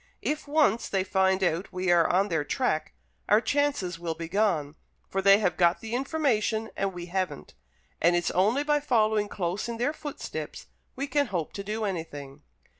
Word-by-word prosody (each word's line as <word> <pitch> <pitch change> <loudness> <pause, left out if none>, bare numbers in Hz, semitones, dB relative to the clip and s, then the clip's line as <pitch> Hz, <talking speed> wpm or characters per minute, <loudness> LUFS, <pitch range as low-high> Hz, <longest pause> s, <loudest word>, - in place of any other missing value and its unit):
If 300 0 -2
once 285 -7 +2
they 195 -1 +1
find 190 0 +2
out 175 +2 0
we 185 0 0
are 170 -1 +4
on 195 +3 +2
their 160 -4 0
track, 155 - -1 0.4
our 210 - +6
chances 255 -11 0
will 170 -1 -3
be 165 0 -6
gone, 170 -6 +1 0.3
for 195 - -1
they 195 +1 +7
have 205 -4 0
got 175 0 +3
the 225 0 -7
information 240 -5 0
and 195 0 -1
we 175 -1 -7
haven't; 180 -4 -3 0.5
and 175 +1 +4
it's 175 -1 0
only 215 +10 +2
by 295 0 +2
following 220 -6 +2
close 190 +4 -3
in 230 - -4
their 260 +6 0
footsteps 295 -2 -6 0.3
we 275 - -2
can 285 -1 +1
hope 175 -7 -3
to 200 - -5
do 215 +2 -3
anything." 150 -7 -5
195 Hz, 185 wpm, -27 LUFS, 175-235 Hz, 0.5 s, they